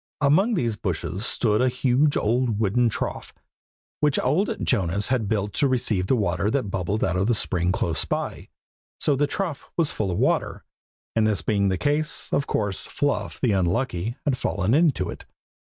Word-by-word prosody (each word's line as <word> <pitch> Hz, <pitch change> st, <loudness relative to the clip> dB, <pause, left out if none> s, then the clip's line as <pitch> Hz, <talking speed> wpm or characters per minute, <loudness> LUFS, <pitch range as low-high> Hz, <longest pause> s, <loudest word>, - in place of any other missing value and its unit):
Among 170 Hz, +11 st, +3 dB
these 115 Hz, -, -1 dB
bushes 90 Hz, +1 st, -3 dB
stood 110 Hz, -2 st, +1 dB
a 130 Hz, -, +3 dB
huge 130 Hz, +3 st, +2 dB
old 115 Hz, 0 st, 0 dB
wooden 115 Hz, +3 st, +2 dB
trough, -, -, -5 dB, 0.6 s
which 150 Hz, -2 st, +2 dB
old 190 Hz, -, +1 dB
Jonas 100 Hz, -2 st, +1 dB
had 120 Hz, -6 st, 0 dB
built 105 Hz, -2 st, -1 dB
to 140 Hz, -, +2 dB
receive 115 Hz, -7 st, 0 dB
the 130 Hz, -, +3 dB
water 100 Hz, -3 st, 0 dB
that 115 Hz, -5 st, -1 dB
bubbled 95 Hz, +4 st, -1 dB
out 90 Hz, -, 0 dB
of 95 Hz, +5 st, +1 dB
a 120 Hz, -, +3 dB
spring 90 Hz, -3 st, +1 dB
close 80 Hz, -6 st, 0 dB
by. -, -, -4 dB, 0.5 s
So 145 Hz, -, +2 dB
the 145 Hz, +2 st, +1 dB
trough 175 Hz, -3 st, -4 dB
was 165 Hz, -3 st, +2 dB
full 105 Hz, -3 st, -2 dB
of 90 Hz, -, -2 dB
water, -, -, 0 dB, 0.5 s
and 110 Hz, -1 st, +3 dB
this 100 Hz, -7 st, 0 dB
being 100 Hz, +1 st, +1 dB
the 95 Hz, -, 0 dB
case, 150 Hz, -, 0 dB
of 140 Hz, -, +1 dB
course 100 Hz, -2 st, -1 dB
Fluff 145 Hz, -1 st, -2 dB
the 125 Hz, -, +2 dB
unlucky 100 Hz, +3 st, -1 dB
had 135 Hz, -4 st, 0 dB
fallen 95 Hz, +5 st, 0 dB
into 145 Hz, -, +3 dB
it. -, -, -10 dB
110 Hz, 180 wpm, -24 LUFS, 95-135 Hz, 0.6 s, Among